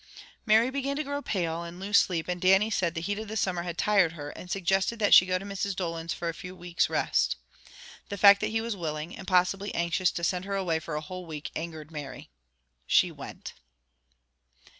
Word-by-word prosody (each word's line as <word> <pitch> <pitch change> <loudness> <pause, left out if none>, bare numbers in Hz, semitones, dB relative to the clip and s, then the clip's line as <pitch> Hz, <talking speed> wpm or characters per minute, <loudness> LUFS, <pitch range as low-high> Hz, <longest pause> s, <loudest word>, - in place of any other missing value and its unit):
Mary 225 +4 +5
began 275 +1 -2
to 305 - -1
grow 285 0 -3
pale, 170 - -2
and 170 +1 -9
lose 200 +2 -2
sleep, 170 -3 -1
and 180 -1 -3
Dannie 195 +4 +4
said 175 -5 0
the 165 - -2
heat 205 +4 -2
of 220 - -6
the 220 +1 -4
summer 185 -4 0
had 175 -1 -5
tired 195 -5 +3
her, 145 -3 -7
and 180 - -11
suggested 195 +4 0
that 210 -2 +3
she 180 - +9
go 185 0 +1
to 190 - -8
Mrs. 200 0 -3
Dolan's 165 -2 -3
for 170 - -3 0.2
a 180 - -6
weeks 175 -1 -1
rest. - - +1 0.7
The 200 - -4
fact 200 0 +7
that 215 - +1
he 225 +1 -1
was 230 -1 -3
willing, 155 -1 -4
and 190 - -10
possibly 190 +2 +2
anxious 170 +1 +1
to 170 - -5
send 180 +1 0
her 200 0 -3
away 175 -5 0
for 160 -1 -6
a 150 - -2
whole 180 +3 -8
week, 150 -2 -6
angered 160 -1 -6
Mary. 145 - -8 0.6
She - - +4
went. - - -9
185 Hz, 210 wpm, -28 LUFS, 170-200 Hz, 0.7 s, she